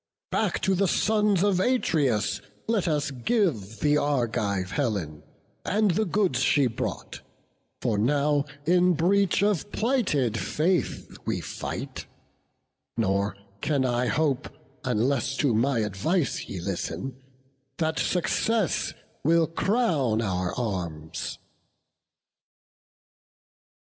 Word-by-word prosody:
Back 210 -5 0
to 190 - +3
the 190 +1 +2
sons 210 -2 +2
of 200 -3 +3
Atreus 150 - +1 0.3
let 220 -5 +1
us 150 -3 0
give 125 - -1
The 150 0 +4
Argive 110 -9 0
Helen, 100 - -2 0.4
and 210 0 +2
the 215 +6 +1
goods 185 - +1
she 135 +2 +3
brought; 120 - -4 0.6
For 110 -4 +1
now 145 +4 +2 0.2
in 180 +2 +4
breach 195 +4 +2
of 205 -1 +1
plighted 170 - +1
faith 175 +4 -1
we - - 0
fight: - - -6 0.9
Nor 100 +1 0 0.2
can 140 -4 +1
I 125 0 +1
hope, 140 +2 0 0.3
unless 130 +3 0
to 140 -6 +2
my 120 +2 +2
advice 110 - -1
Ye 95 - -4
listen, 120 +8 -4 0.6
that 160 -2 0
success 195 +2 0 0.3
will 165 +2 +4
crown 165 - +1
our 95 -4 -1
arms." 85 -8 -4
140 Hz, 105 wpm, -26 LUFS, 110-180 Hz, 0.9 s, The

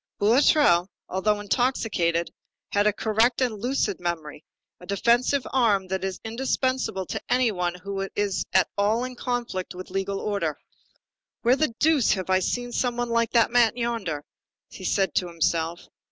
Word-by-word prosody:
Boulatruelle, 215 - +4 0.2
although 205 +3 0
intoxicated, 205 -7 0 0.4
had 205 +1 +2
a - - +5
correct 220 +3 +1
and 250 -4 +1
lucid 235 -4 -1
memory, 160 -4 -4 0.4
a 180 - -12
defensive 240 +6 +2
arm 210 -7 +2
that 190 0 -2
is 190 -1 -3
indispensable 255 -3 -1
to - - -4
any 250 -2 +3
one 180 -2 -2
who 195 +1 -5
is 205 -2 0
at 190 0 +4
all 215 +4 +2
in 255 0 -5
conflict 240 -8 -3
with 185 0 -9
legal 195 +1 -2
order. 185 -8 -2 0.9
"Where 240 +2 +5
the 275 -5 -1
deuce 305 -6 +3
have 190 -2 -3
I 185 - +4
seen 245 +6 -2
something 240 -1 -1
like 230 0 +1
that 230 -1 +4
man 240 -1 +3
yonder?" 225 -11 -2 0.5
he 190 - -10
said 195 0 +1
to 180 - 0
himself. 170 0 -1
205 Hz, 155 wpm, -25 LUFS, 185-240 Hz, 0.9 s, a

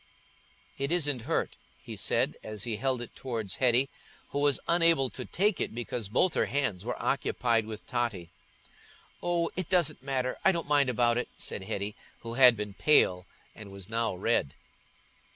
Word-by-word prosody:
"It 140 +2 -1
isn't 145 -7 +1
hurt," 165 - -1 0.3
he - - -7
said, - - +1
as 105 -2 -5
he 115 -3 -2
held 130 0 -1
it 120 - -12
towards 115 -7 -4
Hetty, 125 +1 +3 0.4
who 140 - -1
was 145 -1 +3
unable 165 -6 +4
to - - -6
take 205 +1 +1
it - - -3
because 120 -3 -4
both 175 - +2
her - - +1
hands 125 -10 -1
were 125 +2 -4
occupied 115 -5 0
with 110 -1 -8
Totty. 110 -9 -2 0.9
"Oh, 170 -1 0
it 185 -3 -3
doesn't 180 -4 +2
matter, 130 -2 -2
I 190 - +5
don't 170 -3 -3
mind 145 -2 +3
about 120 0 +2
it," - - -4
said - - -3
Hetty, 100 +2 -4 0.3
who 115 0 -6
had 125 -2 +7
been 105 -1 -5
pale 90 -9 +3 0.3
and 105 -2 -11
was 100 0 -10
now 115 -3 -1
red. 90 -7 0
125 Hz, 170 wpm, -29 LUFS, 110-145 Hz, 0.9 s, had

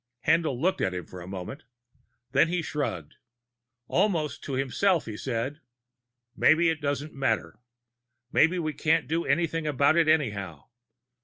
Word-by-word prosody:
Haendl 160 -7 +2
looked 185 +5 +1
at 95 - 0
him 90 - -5
for 90 - -10
a 85 - -9
moment. 95 - -7 0.7
Then 140 +5 +4
he 175 0 -1
shrugged. 110 - -4 0.7
Almost 155 -8 0
to 140 - -4
himself, 135 +8 +1
he 110 - -6
said: 130 +6 -3 0.7
"Maybe 165 +2 +4
it 160 -1 -5
doesn't 145 +1 -2
matter. 135 -1 -1 0.7
Maybe 165 +4 +4
we 155 -3 -2
can't 160 +1 +1
do 165 +2 -1
anything 165 +1 0
about 145 +1 +3
it 165 -2 +4
anyhow. 100 - 0
150 Hz, 145 wpm, -27 LUFS, 125-165 Hz, 0.7 s, Then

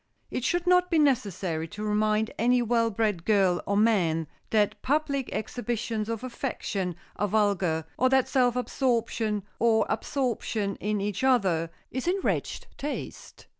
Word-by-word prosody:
It 250 - -3
should 350 +5 0
not 360 0 +4
be 335 - +2
necessary 195 - +1
to 210 +6 -7
remind 215 +1 +1
any 245 +1 +3
well 230 0 +2
bred 210 -5 -1
girl 190 -4 +3
or 200 - +1
man 180 -8 +2 0.2
that 210 -2 +1
public 280 -2 0
exhibitions 225 -1 -3
of 230 +1 -3
affection 205 -8 -3 0.2
are 205 - +1
vulgar, 195 -6 +1
or 255 - +4
that 265 -1 +3
self 250 -2 +2
absorption, 230 -5 0 0.2
or 230 -1 +3
absorption 230 -6 -1
in 210 0 -1
each 205 +4 -2
other, 190 -11 +2 0.2
is 260 +5 -3
in 375 +2 +2
wretched - - -1
taste. 290 +1 -6
220 Hz, 145 wpm, -27 LUFS, 200-255 Hz, 0.2 s, not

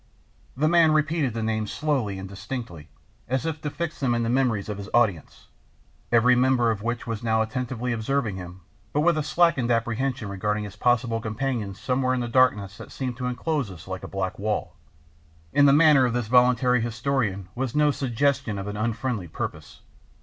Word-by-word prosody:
The 155 +3 +2
man 165 -1 +5
repeated 155 -5 +1
the 115 - -2
names 110 -1 -1
slowly 135 -10 -1
and 95 0 -6
distinctly, 100 - -7 0.4
as 130 +3 -1
if 160 -2 -3
to 150 - -2
fix 170 +1 -5
them 125 -4 +1
in 120 - 0
the 115 - 0
memories 125 -6 +1
of 105 -2 -5
his 100 0 -7
audience, 100 -10 0 0.6
every 120 +2 +5
member 125 -2 +3
of 105 -2 -4
which 120 +2 -3
was 115 -3 -4
now 110 -1 +2
attentively 125 +1 -3
observing 115 -1 -1
him, 90 0 -9 0.3
but 150 - +2
with 170 +1 +3
a 155 - 0
slackened 150 -5 +2
apprehension 120 +1 -1
regarding 105 +2 -2
his 100 -2 -8
possible 115 0 +1
companions 110 -3 -3
somewhere 130 0 0
in - - -1
the 120 - -2
darkness 105 -6 +2
that - - -11
seemed 130 -2 -4
to 125 -1 -3
enclose 125 0 -2
us 90 -3 -11
like 95 0 -5
a - - -5
black 95 -1 -3
wall; 100 -5 -2 0.8
in 145 0 +6
the - - +7
manner 150 -3 +6
of 120 - -2
this 120 -3 -2
volunteer 125 0 +4
historian 115 -4 -1
was 130 0 -3
no 150 0 +4
suggestion 135 -3 0
of 95 - -4
an 105 0 -5
unfriendly 110 -2 -2
purpose. - - -6
120 Hz, 190 wpm, -25 LUFS, 105-135 Hz, 0.8 s, the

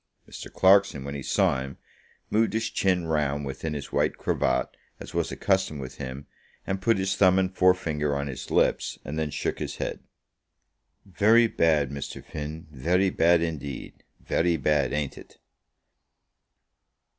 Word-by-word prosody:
Mr. - - -9
Clarkson, 95 -7 +4
when 70 0 -5
he 70 - -5
saw 65 - +1
him, 70 +1 -7 0.5
moved 110 +1 +2
his 110 0 -1
chin 90 -3 +1
round 75 -3 0
within 75 +3 -4
his 70 - -6
white - - +1
cravat, - - 0 0.2
as - - -10
was - - -1
a - - -4
custom 95 -6 0
with 65 -2 -8
him, 70 0 -6 0.4
and 95 0 -3
put 115 +2 +3
his 95 0 0
thumb 95 -1 +5
and 95 0 0
forefinger 80 -6 +2
on 70 0 -2
his 70 -3 -7
lips, - - +1
and 75 +2 -4
then 80 -1 -1
shook - - -3
his - - -4
head. - - -4 1.1
"Very 105 +5 +4
bad, 80 - +2
Mr. 70 -1 -6
Finn; 75 +3 -6
very 90 +8 +1
bad 85 0 +4
indeed; 75 -5 -6 0.2
very 85 0 +1
bad, 75 -2 +1
ain't 75 -2 -3
it?" - - -16
80 Hz, 155 wpm, -26 LUFS, 70-95 Hz, 1.1 s, thumb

